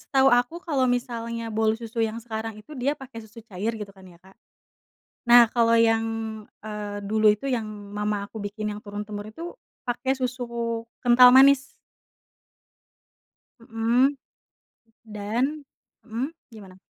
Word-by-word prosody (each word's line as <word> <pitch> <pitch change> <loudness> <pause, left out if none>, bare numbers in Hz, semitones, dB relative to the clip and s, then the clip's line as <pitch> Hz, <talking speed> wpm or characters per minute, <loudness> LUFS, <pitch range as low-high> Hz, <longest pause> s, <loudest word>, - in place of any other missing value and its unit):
Setahu 270 0 +3
aku 245 +6 +2
kalau 275 -6 +1
misalnya 235 -2 -2
bolu 220 0 +2
susu 230 0 -5
yang 225 0 -1
sekarang 225 -1 -5
itu 215 +8 -13
dia 275 +4 0
pakai 265 -4 -10
susu 220 +1 -13
cair 215 +2 -3
gitu 210 -2 -7
kan 190 -1 -18
ya 175 - -16
Kak. 190 +1 -19 1.0
Nah 240 0 +9
kalau 230 -1 +4
yang, 225 0 +3 0.6
eee, 210 -1 -5
dulu 215 +1 +4
itu 210 +6 -2
yang 245 -4 0 0.3
mama 210 -1 -2
aku 220 +1 -9
bikin 210 +1 -4
yang 205 - -8
turun-temurun 205 0 -6
itu 325 +10 -9 0.4
pakai 250 +2 -1
susu 235 -2 -3 0.2
kental 250 +1 +8
manis 270 +1 +7 2.0
Mhm, 235 +4 +1 0.9
dan 230 +8 -2 0.4
mhm, 235 +4 -3 0.2
gimana? 195 -4 -12
230 Hz, 135 wpm, -25 LUFS, 215-245 Hz, 2.0 s, Nah